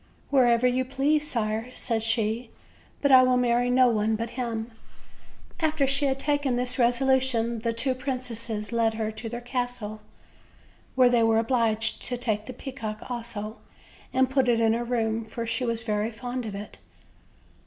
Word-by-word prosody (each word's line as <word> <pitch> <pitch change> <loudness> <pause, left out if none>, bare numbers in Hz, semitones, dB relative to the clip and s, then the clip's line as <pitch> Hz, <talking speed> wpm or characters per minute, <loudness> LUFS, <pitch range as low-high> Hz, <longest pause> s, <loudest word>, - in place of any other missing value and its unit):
"Wherever 245 -3 +4
you 250 +1 +2
please, 290 +4 +1
sire," 220 0 -2
said 230 -2 -2
she; 225 +1 0 0.5
"but 280 - +4
I 260 -1 +9
will 255 0 +3
marry 245 0 +2
no 255 0 +5
one 220 -1 +1
but 230 +1 -4
him." 235 -2 -4 0.9
After 315 -3 +1
she 275 +2 +2
had 270 -1 +1
taken 285 -3 0
this 250 +1 -1
resolution 245 -1 +2
the 230 +1 -1
two 255 +3 0
princes 240 -5 -4
led 230 -1 +1
her 220 -1 -2
to 220 +1 -6
their 240 +1 -5
castle, 245 -4 -4 0.9
where 255 -1 +5
they 240 -1 +4
were 225 0 +4
obliged 225 -1 +1
to 245 - -1
take 220 -3 -2
the - - -5
peacock 245 -4 -7
also, 225 -3 -5 0.5
and 260 0 +3
put 265 -1 +1
it 235 -1 +3
in 225 -1 +3
her 235 +1 -1
room, 230 -2 -1
for 225 +1 -5
she 250 +2 -1
was 230 -1 -1
very 210 0 -1
fond 245 +1 -5
of 205 - -5
it. 205 +1 -9
235 Hz, 170 wpm, -26 LUFS, 225-255 Hz, 0.9 s, I